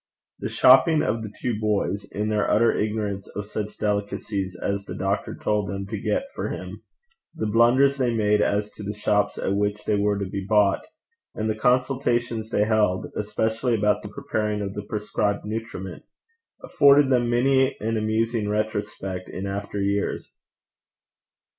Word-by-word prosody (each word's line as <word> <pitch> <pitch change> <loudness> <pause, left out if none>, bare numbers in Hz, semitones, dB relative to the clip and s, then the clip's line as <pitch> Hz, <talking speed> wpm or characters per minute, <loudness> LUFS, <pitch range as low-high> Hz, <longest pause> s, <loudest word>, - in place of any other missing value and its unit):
The - - -3
shopping 135 +5 +5
of 115 +1 -1
the 110 -2 -6
two 115 -4 -2
boys, 105 -2 0
in 105 +1 -2
their 105 -1 +1
utter 115 +3 +3
ignorance 105 -2 -2
of 105 +1 -4
such 105 0 -5
delicacies 100 -2 -2
as 100 0 -2
the - - -7
doctor 100 +2 -2
told 105 -1 -1
them 100 0 -4
to 100 0 -5
get 270 - 0
for - - -3
him, - - -7 0.5
the 110 - -2
blunders 120 +6 +4
they 125 -3 +1
made 105 -2 +2
as 105 0 0
to - - -12
the 105 +1 -4
shops 105 0 +1
at 95 - -1
which 105 +1 -1
they 105 - +1
were 100 0 +1
to 100 - -2
be 95 +1 -4
bought, 100 -1 +3 0.5
and 110 - -2
the 110 - +1
consultations 120 -1 0
they 105 - +2
held, 105 -4 +1
especially 110 +3 0
about 105 -1 +2
the 105 - -8
preparing 105 -4 -2
of 100 -1 -4
the 105 - -4
prescribed 105 -1 -1
nutriment, 105 -4 -5 0.6
afforded 140 -1 +5
them 120 -2 +2
many 130 +2 +2
an 115 +2 -1
amusing 110 0 0
retrospect 105 -3 -3
in 95 - -5
after 100 +1 -4
years. 100 +1 -1
105 Hz, 165 wpm, -24 LUFS, 100-115 Hz, 0.6 s, shopping